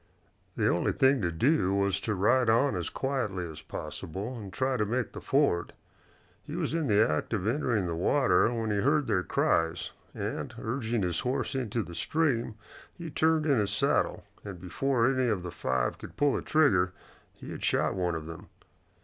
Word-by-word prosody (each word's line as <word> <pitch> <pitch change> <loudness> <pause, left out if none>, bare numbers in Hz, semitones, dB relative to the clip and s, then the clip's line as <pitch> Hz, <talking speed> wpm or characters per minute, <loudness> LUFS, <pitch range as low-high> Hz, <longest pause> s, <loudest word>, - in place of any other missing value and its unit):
The - - +1
only 85 - +1
thing 135 -1 +3
to 85 -3 0
do 100 - +2
was 100 -1 +1
to 110 - -1
ride 120 +5 +3
on 115 +2 +3
as 85 -3 -2
quietly 125 -10 -2
as 80 -2 -9
possible 100 +10 -6
and 105 -5 -8
try 130 +4 0
to 110 - +1
make 120 +3 -1
the - - -8
ford. 135 -11 +1 0.7
He - - -8
was - - -2
in 165 -3 0
the 105 0 +4
act 75 +8 -2
of 100 -4 -1
entering 115 -4 +1
the 85 - -2
water 125 - +3
when 115 -2 -2
he 105 - 0
heard 145 +5 +2
their 100 -5 +1
cries, 80 -2 0 0.2
and, - - -4
urging 115 -2 -2
his 90 -2 0
horse 130 0 -1
into 120 -4 -1
the 85 - -10
stream, 120 - 0 0.4
he 165 -2 -7
turned 160 +1 +2
in 140 -6 +3
his 105 -2 0
saddle, 105 - +1 0.2
and 95 -4 -7
before 115 +8 0
any 130 -1 +2
of 100 -5 -1
the 90 - -5
five 65 -6 -1
could - - -11
pull 145 -2 +3
a - - -1
trigger 95 - +3 0.4
he - - -10
had - - -7
shot - - +2
one 90 -3 -1
of 80 -1 -5
them. 85 +5 -9
110 Hz, 190 wpm, -29 LUFS, 90-135 Hz, 0.7 s, the